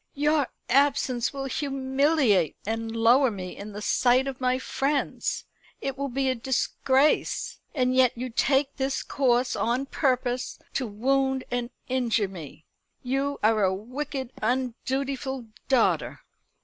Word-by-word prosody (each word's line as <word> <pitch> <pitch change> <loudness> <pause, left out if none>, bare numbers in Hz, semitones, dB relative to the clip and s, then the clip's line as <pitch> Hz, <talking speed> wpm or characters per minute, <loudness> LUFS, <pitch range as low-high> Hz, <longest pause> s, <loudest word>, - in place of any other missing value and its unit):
"Your 295 -1 +2 0.2
absence 265 -2 +2
will 275 -1 -5
humiliate 270 - +1
and 225 +1 -3
lower 240 +4 +5
me 185 -4 -6
in 210 +1 -8
the 210 +1 -7
sight 250 +4 +3
of 265 -1 -5
my 255 0 +2
friends. 275 +2 -1 0.3
It 270 -1 -3
will 280 +1 -2
be 270 +1 -1
a 260 - +3
disgrace. 265 +3 +1 0.2
And 255 -2 +2
yet 255 -2 +4
you 250 +1 -4
take 270 +3 +1
this 270 0 -1
course 250 -2 +1
on 245 +4 0
purpose 255 -3 -1 0.2
to 255 - -1
wound 265 +5 +1
and 245 -1 -1 0.2
injure 240 -5 +1
me. 165 -5 -10 0.4
You 275 +2 -1
are 215 -1 +4
a 190 0 +2
wicked 260 +4 -5
undutiful 260 +2 -2 0.2
daughter." 255 -4 +2
260 Hz, 135 wpm, -26 LUFS, 235-270 Hz, 0.4 s, lower